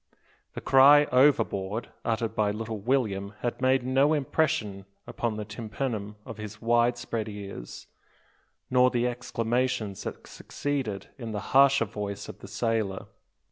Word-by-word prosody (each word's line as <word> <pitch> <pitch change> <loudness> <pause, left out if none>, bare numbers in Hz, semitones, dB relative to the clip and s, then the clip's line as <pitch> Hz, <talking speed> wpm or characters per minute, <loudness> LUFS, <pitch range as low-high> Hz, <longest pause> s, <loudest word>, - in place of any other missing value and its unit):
The - - -5
cry 145 +2 +7
"Overboard!" 115 -6 +2
uttered 115 0 -1
by 105 -1 +1
little 110 +1 -4
William 105 -4 -1
had 120 +1 -3
made 130 0 +3
no 135 +4 +3
impression 140 -9 0 0.2
upon 115 -3 -3
the 105 - -4
tympanum 105 0 -4
of 115 - -8
his 105 0 -7
wide 120 +1 +2
spread 115 -2 -4
ears, 100 - -8 0.9
nor 125 0 +5
the 120 -1 0
exclamations 120 -3 -1
that - - -6
succeeded 135 -9 -4
in 115 -3 -5
the 105 - -2
harsher 135 -2 +6
voice 100 -2 -5
of - - -10
the - - -10
sailor. 110 -5 -2
115 Hz, 140 wpm, -27 LUFS, 105-130 Hz, 0.9 s, cry